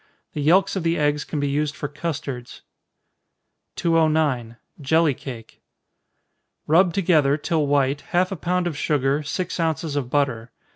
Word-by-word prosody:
The 150 Hz, -, -3 dB
yelks 180 Hz, +8 st, +3 dB
of 190 Hz, -, -1 dB
the 165 Hz, 0 st, 0 dB
eggs 150 Hz, 0 st, +1 dB
can 150 Hz, -, -4 dB
be 145 Hz, -, 0 dB
used 145 Hz, +1 st, -1 dB
for 145 Hz, -, -4 dB
custards. 145 Hz, -5 st, -6 dB, 1.1 s
209. 155 Hz, -8 st, +1 dB, 0.2 s
Jelly 160 Hz, +2 st, +3 dB
Cake. 120 Hz, -3 st, -10 dB, 1.0 s
Rub 175 Hz, +4 st, +4 dB
together, 155 Hz, -6 st, +2 dB
till 155 Hz, -1 st, 0 dB
white, 140 Hz, 0 st, +1 dB
half 180 Hz, +2 st, +1 dB
a -, -, -2 dB
pound 180 Hz, +2 st, -1 dB
of 170 Hz, -4 st, -2 dB
sugar, 145 Hz, -1 st, 0 dB
six 175 Hz, +5 st, -4 dB
ounces 160 Hz, -2 st, -1 dB
of 135 Hz, -4 st, -2 dB
butter. 125 Hz, -5 st, 0 dB
150 Hz, 145 wpm, -23 LUFS, 140-165 Hz, 1.1 s, Rub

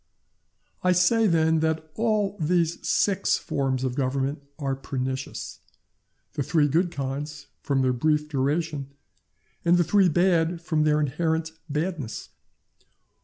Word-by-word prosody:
I 180 Hz, 0 st, +4 dB
say, 215 Hz, +6 st, +4 dB
then, 160 Hz, -2 st, +3 dB
that 160 Hz, 0 st, -1 dB
all 215 Hz, -2 st, 0 dB
these 170 Hz, +1 st, +1 dB
six 195 Hz, -1 st, +2 dB
forms 130 Hz, -2 st, -1 dB
of 130 Hz, -1 st, -1 dB
government 135 Hz, +2 st, -1 dB, 0.2 s
are 135 Hz, -3 st, -2 dB
pernicious—the 130 Hz, +2 st, -7 dB
three 150 Hz, +1 st, +2 dB
good 170 Hz, +5 st, +2 dB
kinds, 145 Hz, -1 st, -5 dB, 0.2 s
from 135 Hz, -2 st, +1 dB
their 130 Hz, -1 st, +2 dB
brief 150 Hz, +4 st, +1 dB
duration 145 Hz, 0 st, -1 dB, 0.7 s
the 175 Hz, +1 st, +4 dB
three 195 Hz, +1 st, +4 dB
bad, 175 Hz, 0 st, +2 dB
from 160 Hz, -2 st, 0 dB
their 150 Hz, 0 st, +3 dB
inherent 160 Hz, +3 st, -1 dB, 0.2 s
badness. 150 Hz, -5 st, -3 dB
155 Hz, 120 wpm, -25 LUFS, 140-175 Hz, 0.7 s, I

